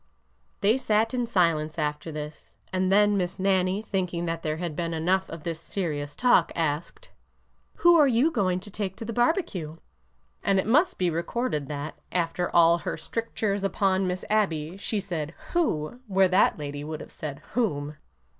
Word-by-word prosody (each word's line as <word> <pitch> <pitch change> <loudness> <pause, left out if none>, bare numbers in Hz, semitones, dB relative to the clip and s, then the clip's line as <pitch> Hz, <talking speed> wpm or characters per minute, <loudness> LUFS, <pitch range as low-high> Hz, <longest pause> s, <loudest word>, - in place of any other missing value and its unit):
They 215 +6 +3
sat 220 0 +1
in 245 -2 0
silence 165 -6 +1
after 150 +1 -2
this, 150 0 -8 0.2
and 185 0 +1
then 205 +1 +5
Miss 180 0 -2
Nannie, 190 +1 +1
thinking 180 -4 -2
that 165 0 -2
there 155 -1 -2
had 170 -2 -4
been 170 0 -2
enough 185 +4 +1
of 165 -2 -8
this 165 -2 -3
serious 150 -5 -3
talk, 250 -1 +4
asked: 160 0 -3 0.3
'' - - -42
Who 345 0 +8
are 295 -3 +6
you 260 +6 +3
going 185 - 0
to 205 - -10
take 195 -2 -3
to 225 - -7
the 230 - -4
barbecue? 230 - 0 0.3
" 60 0 -41
And 195 - +3
it 190 - +1
must 305 - +3
be 180 -2 +1
recorded 170 - -2
that, 145 +1 -5
after 175 0 0
all 170 0 +5
her - - -4
strictures 215 -3 -2
upon 195 -1 +1
Miss 180 0 -3
Abby, 175 -6 0
she 205 +1 -2
said 170 -5 -4 0.2
who 245 - 0
where 190 -1 +4
that 185 - +4
lady 145 -1 -5
would 155 0 -5
have - - -10
said 145 -1 -7
whom. 150 -11 -1
180 Hz, 180 wpm, -26 LUFS, 155-205 Hz, 0.3 s, Who